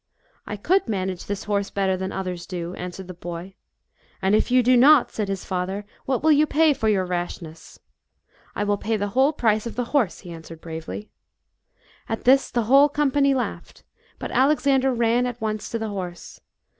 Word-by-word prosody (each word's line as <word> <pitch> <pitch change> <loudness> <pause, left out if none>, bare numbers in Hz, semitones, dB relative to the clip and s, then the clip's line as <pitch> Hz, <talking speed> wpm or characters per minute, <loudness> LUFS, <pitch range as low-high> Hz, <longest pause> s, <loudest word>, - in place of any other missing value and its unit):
*" - - -36 0.2
a - - -5
I - - -4
could 365 - +1
manage 190 -4 -3
this 205 -1 -3
horse 200 -1 -1
better 190 -1 0
than 190 +1 -4
others 180 -2 -5
do," 175 -1 -5
answered 180 +1 -7
the 185 - -7
boy. 175 +2 -7 0.3
" - - -36
And 190 +1 +2
if 215 - +2
you 250 0 +4
do 250 +2 +5
not," 270 +2 +6
said 210 -2 -3
his 195 -1 -4
father, 190 +2 -3
" - - -32
what 260 -1 0
will 315 - +5
you 300 +1 +4
pay 310 0 +4
for 220 -5 0
your 195 -3 +2
rashness? 175 -2 -6 0.3
" - - -52
" - - -31
I 205 - -1
will 205 0 +1
pay 220 0 -1
the 205 0 -2
whole 265 +7 +3
price 220 -6 +1
of 235 - -7
the 245 - -1
horse," 245 -11 +1
he 175 - -10
answered 165 0 -10
bravely. 165 +6 -7 1.0
At 225 - -3
this 270 +2 +4
the 240 - 0
whole 275 +6 +6
company 280 -1 +2
laughed, 250 - -5 0.3
but - - -6
Alex 265 +1 +2
ander 270 -1 +3
ran 240 +1 +2
at 245 -1 -6
once 215 -1 -3
to 230 - -2
the 220 -1 -4
horse. 180 -4 -7
215 Hz, 215 wpm, -23 LUFS, 185-255 Hz, 1.0 s, not